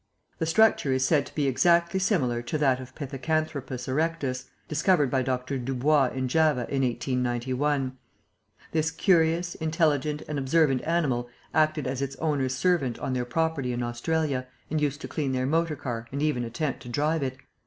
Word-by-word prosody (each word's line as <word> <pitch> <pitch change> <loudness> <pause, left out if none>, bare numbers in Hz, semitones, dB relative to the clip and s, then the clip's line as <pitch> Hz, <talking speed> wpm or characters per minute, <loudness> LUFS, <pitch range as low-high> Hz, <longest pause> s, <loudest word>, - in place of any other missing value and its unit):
The 160 - 0
structure 215 -6 +4
is 130 0 +2
said 150 -1 +2
to - - -16
be 145 - +1
exactly 170 +7 +3
similar 140 - +1
to 120 +6 -3
that 135 -4 +2
of 130 0 -10
Pithecanthropus 140 -2 -3
erectus, 140 -3 -1 0.2
discovered 150 -2 +2
by 130 - +2
Dr. 130 +1 -2
Dubois 135 +3 +2
in 130 -1 -1
Java 155 -1 +3
in 135 -1 +1
1891. 130 +2 -1 0.8
"This 160 0 +1
curious, 170 0 +2
intelligent 155 -2 0
and 150 -1 -2
observant 135 -1 +2
animal 135 -8 0 0.2
acted 155 -1 +2
as 130 +1 -2
its 140 0 -3
owner's 140 -5 0
servant 135 -6 +1
on 130 - -3
their 125 -1 -1
property 145 -1 -1
in 120 0 -2
Australia 130 +2 -1 0.2
and 155 -1 0
used 145 -1 -1
to - - -5
clean 140 -4 -2
their 130 0 0
motor 165 +2 +1
car 120 -5 -5
and 140 +2 -2
even 150 -6 +1
attempt 140 +4 -3
to 120 - -10
drive 150 +6 0
it. 130 -1 -2
140 Hz, 170 wpm, -27 LUFS, 130-160 Hz, 0.8 s, structure